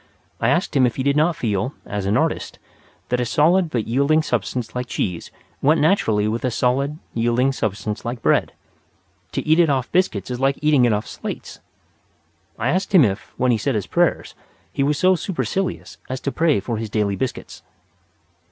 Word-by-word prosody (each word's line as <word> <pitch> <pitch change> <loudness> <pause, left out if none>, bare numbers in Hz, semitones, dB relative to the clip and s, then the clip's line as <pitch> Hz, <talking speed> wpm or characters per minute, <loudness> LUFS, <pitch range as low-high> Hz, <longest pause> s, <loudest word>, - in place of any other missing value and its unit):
I - - +2
asked - - 0
him 130 -2 +5
if 120 - -4
he 130 - -2
did 140 +1 +2
not 160 +3 +2
feel, 110 +2 -2
as 100 -1 -3
an 100 - +2
artist, - - -1 0.5
that 125 - +1
a - - +1
solid 165 +8 +3
but 120 -6 -2
yielding 140 +6 +2
substance 120 -2 -2
like 125 0 -3
cheese 90 -7 -3 0.3
went 155 +4 +4
naturally 115 - +2
with 115 +2 -2
a 130 - +1
solid, 135 +5 0 0.2
yielding 120 +3 +2
substance 105 -3 -3
like 120 0 -5
bread; - - +2 0.8
to - - -2
eat 155 +2 +4
it 170 -3 +5
off 130 -3 0
biscuits 130 - 0
is 125 - -3
like 135 +1 +1
eating 150 -4 +4
it 120 - +3
off 105 +1 -1
slates. - - -7 1.0
I 115 +3 -1
asked 185 +4 0
him 160 -8 +8
if, 100 -1 -3
when 125 0 +2
he 115 - +1
said 135 +2 -1
his 105 - -1
prayers, - - 0 0.4
he - - -1
was 145 +1 +2
so 185 +4 +4
supercilious 190 +1 -3
as 130 0 -3
to 140 - -2
pray 160 -6 +2
for 115 +3 -3
his 110 0 -4
daily 105 -1 0
biscuits. 130 +4 -5
125 Hz, 190 wpm, -21 LUFS, 110-150 Hz, 1.0 s, him